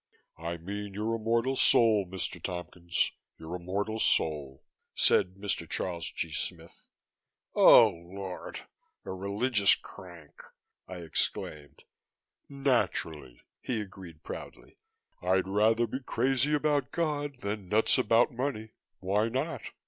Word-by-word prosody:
"I 85 +1 -4
mean 100 +3 -6
your 110 +2 -1
immortal 115 +4 +1
soul, 110 -6 +4
Mr. 95 -1 -5
Tompkins, 85 -1 -2 0.3
your 80 +2 -6
immortal 100 +5 -3
soul," 75 -9 +1 0.3
said 90 +1 +3
Mr. 95 -4 -3
Charles 85 -3 -2
G. - - -2
Smith. - - -6 0.7
"Oh 115 -2 +8
Lord! 90 +1 -8 0.4
A - - -5
religious 100 +3 +2
crank!" 85 -5 -13 0.5
I 95 - -7
exclaimed. 75 -2 -3 0.7
"Naturally," 105 - -1 0.2
he 120 -4 -2
agreed 95 -6 -9
proudly. - - -9 0.4
"I'd 95 +1 +2
rather 110 +4 +3
be 125 +4 -4
crazy 135 +3 +1
about 150 -1 +1
God 145 -5 -2
than 100 -2 -4
nuts 110 +3 +3
about 115 +2 +4
money. 120 -4 -3 0.3
Why 105 +4 +1
not?" 135 +2 -2
100 Hz, 115 wpm, -30 LUFS, 90-115 Hz, 0.7 s, Oh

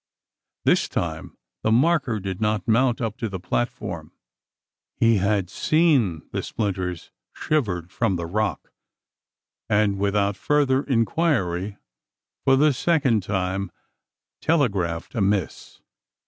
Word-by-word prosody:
This - - +3
time - - -4 0.2
the 110 - +1
marker 135 -2 +2
did 95 +1 -5
not 105 -2 0
mount 120 +2 +2
up 115 -2 -2
to 115 - -3
the 95 -2 -5
platform. - - -3 0.8
He 115 -1 +3
had 100 -1 +1
seen 130 - +2
the - - -2
splinters 90 -5 -3 0.2
shivered 90 - -1
from 115 -5 0
the 85 -1 -3
rock; 105 +4 -2 1.0
and 105 -2 +2
without 100 0 +1
further 140 -1 +2
inquiry, 115 - 0 0.7
for 135 - +5
the 145 +2 +4
second 135 -6 +2
time, 95 -1 -2 0.7
telegraphed 100 - 0
a 115 - -1
miss. 100 -2 -1
105 Hz, 115 wpm, -24 LUFS, 95-130 Hz, 1.0 s, for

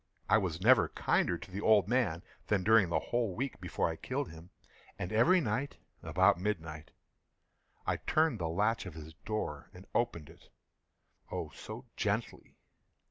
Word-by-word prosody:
I 110 - +5
was 90 -5 -2
never 110 -5 +5
kinder 85 - +1
to 95 - -12
the 100 +2 -4
old 105 -4 +5
man 110 -9 +1 0.2
than 100 -3 +1
during 110 -3 +5
the - - +1
whole 115 -6 -1
week 135 +4 -4
before - - -1
I 80 -1 -4
killed 135 - -3
him. 80 +2 -12 0.5
And 90 - -4
every 170 +13 +5
night, 135 0 -2 0.2
about - - +3
midnight, 80 -6 -3 1.0
I - - 0
turned 155 -7 +1
the 85 -2 -1
latch 105 +5 0
of 85 - -9
his 80 0 -9
door 75 -9 -3
and 90 +2 -12
opened 115 -11 -1
it—oh, - - -11
so - - -9
gently! - - -2
100 Hz, 155 wpm, -32 LUFS, 85-115 Hz, 1.0 s, I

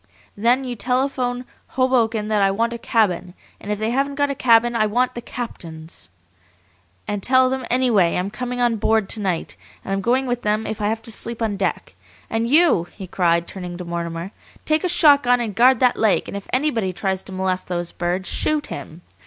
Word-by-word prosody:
Then 240 +5 +2
you 250 -2 -4
telephone 250 +1 -1 0.3
Hoboken 230 -4 +2
that 210 -1 +2
I 195 - +4
want 230 +4 0
a 235 - -6
cabin, 185 -6 0 0.2
and 205 - -6
if 210 - -1
they 215 +2 -1
haven't 275 +2 0
got 285 0 +1
a - - -1
cabin 240 -2 +3
I 215 -2 +2
want 250 +4 +1
the 240 - -6
captain's. 160 - -8 1.0
And 205 -1 -2
tell 255 +3 +4
them 260 -1 -3
anyway 235 -9 +3
I'm 185 +3 -2
coming 250 +2 -4
on 240 -2 +2
board 220 -1 +1
to 225 - +1
night, 185 -5 -2 0.3
and 195 - -2
I'm 195 - -1
going 255 +6 +1
with 245 -1 -2
them 215 +1 0
if 220 -1 -4
I 205 - +1
have 225 +1 -2
to 230 - -4
sleep 230 +1 -5
on 220 -3 -1
deck. 190 - -2 0.4
And 225 +1 0
YOU," 300 - +4
he 195 - -9
cried, 170 -2 +1
turning 180 -2 -7
to 180 - -7
Mortimer, 170 +1 -4 0.3
"take 310 0 +1
a 365 - +1
shotgun 285 -7 +5
and 225 -4 -3
guard 245 +3 +5
that 250 -1 +3
lake, 215 -3 +2
and - - -6
if 200 - -7
anybody 235 -9 0
tries 190 -1 -2
to - - -9
molest 185 -1 -2
those 175 -1 -3
birds 180 +2 -2
shoot 305 +7 0
him! 165 +3 -9
225 Hz, 205 wpm, -21 LUFS, 190-250 Hz, 1.0 s, shotgun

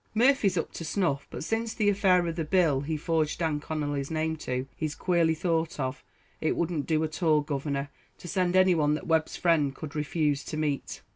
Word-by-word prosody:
"Murphy's 230 -6 +3
up 165 - -2
to - - -7
snuff; 155 -5 -1
but - - -6
since 225 +5 -2
the 215 -3 +1
affair 190 -3 +4
of 165 -1 -2
the 165 - -1
bill 155 -5 +2
he 155 +2 -2
forged 160 0 0
Dan 160 -3 0
Connolly's 145 -2 -3
name 160 0 -1
to, 130 -3 -3
he's 155 -2 -3
queerly 170 -3 +2
thought 165 -1 -1
of. 130 +1 -3 0.4
It 155 - 0
wouldn't 165 -4 -1
do 155 -1 +2
at 155 +2 -4
all, 155 -3 +4
governor, 140 -1 -3 0.3
to - - -10
send 180 0 0
anyone 170 -6 +4
that - - -6
Webb's 160 -1 +1
friend 150 -6 +2
could 155 +1 -8
refuse 150 -1 0
to 155 - -5
meet." 150 -3 -2
160 Hz, 200 wpm, -28 LUFS, 150-175 Hz, 0.4 s, affair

